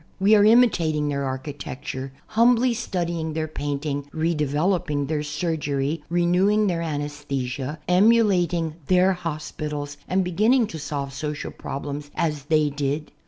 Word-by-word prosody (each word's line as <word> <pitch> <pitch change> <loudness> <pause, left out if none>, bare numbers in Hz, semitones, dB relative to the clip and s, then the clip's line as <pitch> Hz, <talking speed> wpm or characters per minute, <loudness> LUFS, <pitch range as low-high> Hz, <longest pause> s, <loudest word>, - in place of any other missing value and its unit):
We 200 +3 +4
are 205 -1 +7
imitating 175 -10 +4
their 140 -1 -1
architecture, 130 0 -5 0.2
humbly 240 +2 +4
studying 170 -8 -2
their 155 0 -2
painting, 145 -1 -3
redevelc^ping 150 -1 0
their 150 0 -1
surgery, 150 -1 -2
renewing 180 +5 +3
their 175 -4 0
anesthesia, 145 -3 -3
emulating 180 -5 +3
their 185 +1 +4
hospitals 150 -4 -5
and 190 +1 +1
beginning 220 +8 +3
to 160 - -5
solve 140 -2 -4
social 150 +1 -4
problems 145 +1 -6
as 150 -4 -1
they 155 -1 +2
did. 145 +1 -2
155 Hz, 120 wpm, -24 LUFS, 145-180 Hz, 0.2 s, are